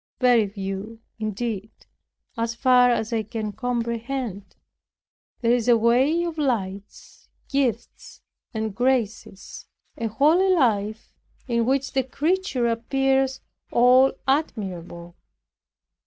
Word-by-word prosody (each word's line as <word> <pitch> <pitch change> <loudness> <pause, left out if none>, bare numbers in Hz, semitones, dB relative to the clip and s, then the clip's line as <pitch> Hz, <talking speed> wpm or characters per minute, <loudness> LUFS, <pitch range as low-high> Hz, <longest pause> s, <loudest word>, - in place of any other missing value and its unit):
Very 245 -4 +4
few, 195 +2 -6 0.2
indeed, 215 -1 -3 0.7
as 230 0 -2
far 250 0 +5
as 235 -1 -1
I 225 - +1
can 215 0 -5
comprehend. 235 -1 -4 0.9
There 235 -1 +2
is 245 -1 0
a 240 -1 +6
way 255 +9 +3
of 335 -2 -4
lights, 200 -8 -4 0.2
gifts 260 -5 -3 0.3
and 220 -2 -3
graces, 225 -4 -2 0.3
a 230 - -3
holy 305 - +3
life 220 - 0 0.3
in 235 -2 0
which 270 +1 0
the 265 - +2
creature 295 0 -1
appears 265 +3 0 0.3
all 250 +2 +5
admirable. 180 - -3
235 Hz, 105 wpm, -24 LUFS, 215-265 Hz, 0.9 s, a